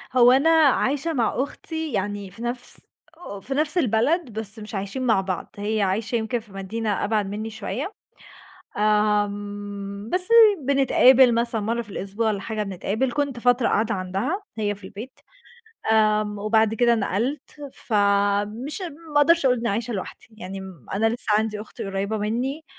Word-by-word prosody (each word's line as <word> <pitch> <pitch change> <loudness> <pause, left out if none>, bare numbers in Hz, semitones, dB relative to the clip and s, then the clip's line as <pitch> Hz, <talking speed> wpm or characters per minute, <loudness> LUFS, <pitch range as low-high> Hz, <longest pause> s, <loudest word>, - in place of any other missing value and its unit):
هو 245 0 +7
أنا 275 +5 +4
عايشة 310 0 +3
مع 235 -5 +1
أختي 320 0 -6
يعني 200 -1 -3
في 225 - -13
نَفْس 245 +1 -5 0.4
آه، 200 - -8
في 270 +7 -5
نَفْس 305 +4 0
البلد 260 - +1
بس 220 +1 -8
مش 210 0 -8
عايشين 200 +7 -3
مع 220 -5 +3
بعض، 185 -2 -4
هي 210 +1 -1
عايشة 215 +5 0
يمكن 230 +2 -1
في 215 -3 -18
مدينة 205 +2 -2
أبعد 210 -1 +1
منّي 215 +2 -4
شوية، 235 - -5 0.8
آمم، 205 -1 -1
بس 365 +2 0 0.4
بنتقابل 260 -2 +5
مثلًا 235 -1 0
مرّة 230 +3 -1
في 210 - -17
الأسبوع 200 +4 -3
والّا 205 -2 0
حاجة 215 0 -3
بنتقابل، 205 +6 -2
كُنت 285 -4 -1
فترة 245 0 +3
قاعدة 220 +1 +1
عندها 195 - -2 0.2
هي 205 -1 0
في 200 -1 -16
البيت، 215 +7 -9 0.7
آمم، 215 -1 +2
وبعد 220 +1 +2
كده 235 +1 +3
نقلْت، 230 +7 -2 0.2
فمش 205 - 0
ما 320 -3 -5
أقدرش 320 +1 +4
أقول 250 -1 +4
إن - - -6
أنا 235 - 0
عايشة 230 +3 -2
لوحدي، 190 - -6
يعني 195 -2 -7
م 185 -8 -11
أنا 220 +3 +2
لسّه 230 -2 -1
عندي 215 -1 -1
أخت 215 - -10
قريّبة 195 +2 -2
منّي، 250 +9 -2
220 Hz, 165 wpm, -24 LUFS, 205-255 Hz, 0.8 s, هو